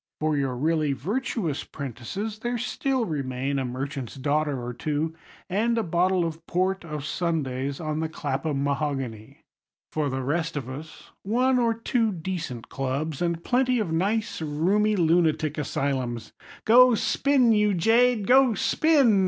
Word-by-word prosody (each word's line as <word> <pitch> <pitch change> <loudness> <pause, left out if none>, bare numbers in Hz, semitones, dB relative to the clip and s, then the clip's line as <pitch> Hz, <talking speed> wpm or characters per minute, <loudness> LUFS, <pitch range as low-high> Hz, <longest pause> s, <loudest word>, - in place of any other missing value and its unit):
For 155 0 +1
your 135 -3 -1
really 155 0 +1
virtuous 185 - -2
'prentices 150 - -6
there 240 +2 -2
still 255 +1 -1
remain 135 -3 -2
a 130 - -1
merchant's 130 0 -5
daughter 145 0 0
or 120 0 -5
two, 155 +4 -2 0.3
and 225 +5 +1
a 225 - +1
bottle 180 0 +2
of 165 0 -5
port 185 +2 0
o' 155 -2 -5
Sundays 140 -4 -2
on 155 -2 -2
the 160 0 -1
Clapham 140 -1 -2
mahogany. 140 -3 -3 0.5
For 150 -2 0
the 130 0 -3
rest 160 +3 -1
of 130 -4 -4
us, 145 +5 -9
one 250 +5 +2
or 230 -2 +2
two 230 -1 0
decent 165 - -5
clubs, 140 +3 -3
and 170 -1 -1
plenty 255 0 +2
of 210 -8 -1
nice 200 +5 0
roomy 185 +8 +1
lunatic 160 -3 +2
asylums. 130 -5 -2 0.3
"Go 250 +2 +7
spin, 260 +1 +3
you 210 -2 +3
jade, 225 +4 +3
go 255 0 +5
spin!" 275 -10 +3
160 Hz, 145 wpm, -26 LUFS, 140-215 Hz, 0.5 s, Go